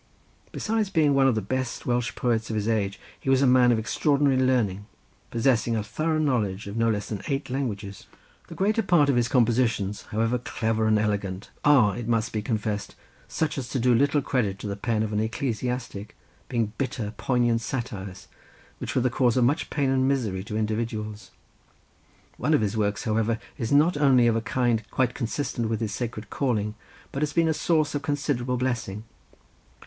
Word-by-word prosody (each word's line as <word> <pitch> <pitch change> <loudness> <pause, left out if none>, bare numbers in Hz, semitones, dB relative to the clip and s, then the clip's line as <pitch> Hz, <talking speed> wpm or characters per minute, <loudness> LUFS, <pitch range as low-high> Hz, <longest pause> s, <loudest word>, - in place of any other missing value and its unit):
Besides 220 -2 -1
being 155 -6 +3
one 135 -1 +4
of 130 - +3
the 110 - -1
best 130 +4 -3
Welsh 120 -1 0
poets 115 -2 0
of 110 - -2
his 105 0 -1
age 105 -3 0 0.2
he - - -4
was 135 0 +4
a - - +5
man 125 -1 +5
of 115 - +3
extraordinary 140 +4 +2
learning, 120 -7 +1 0.4
possessing 115 -1 +1
a 110 - -1
thorough 155 +9 -1
knowledge 110 -10 0
of 100 +1 -6
no 115 0 +2
less 105 -2 -1
than 105 -3 -4
eight 135 -3 -2
languages. 105 - -4 0.4
The - - -9
greater 210 +4 +2
part 170 -8 +3
of 135 - +3
his 120 -1 +2
compositions, 115 -6 +1
however 115 +3 0
clever 110 -2 -1
and 110 0 +4
elegant, 100 -3 -2
are, 125 -9 +5
it 120 -2 -5
must 115 -1 0
be 110 - -1
confessed, 105 -2 -3 0.3
such 155 -3 -1
as 125 -3 -6
do 125 -1 +2
little 140 +3 +3
credit 110 -8 0
to 105 - -6
the 100 - -3
pen 110 +1 -1
of 110 -1 -3
an 105 - +1
ecclesiastic, 115 -2 -3 0.3
being 115 -4 -1
bitter 120 -5 -2
poignant 120 -3 +1
satires, 105 -8 -5 0.5
which - - -5
were 130 - +3
the 130 - +1
cause 125 -1 +2
of 125 - +4
much 145 +6 +1
pain 140 -3 0
and 130 0 +2
misery 110 -9 0
to 105 - -4
individuals; 110 -1 -3 1.1
one 155 +5 +2
of - - +2
his 105 0 -1
works, 105 -1 0
however, 110 +1 +1 0.2
is 115 - -2
not 150 +4 +4
only 135 -4 +5
of 115 -1 +3
a 115 - 0
kind 120 -1 +1
quite 125 -1 +1
consistent 115 -1 -2
with 110 - -1
his 110 -3 -2
sacred 110 -2 -5
calling, 110 -6 0 0.4
but 140 - -4
has 150 -1 0
been 165 -1 +3
a 160 - +2
source 155 -1 +1
of 145 - -1
considerable 140 -4 -1
blessing. 120 -5 -2
120 Hz, 190 wpm, -26 LUFS, 110-135 Hz, 1.1 s, a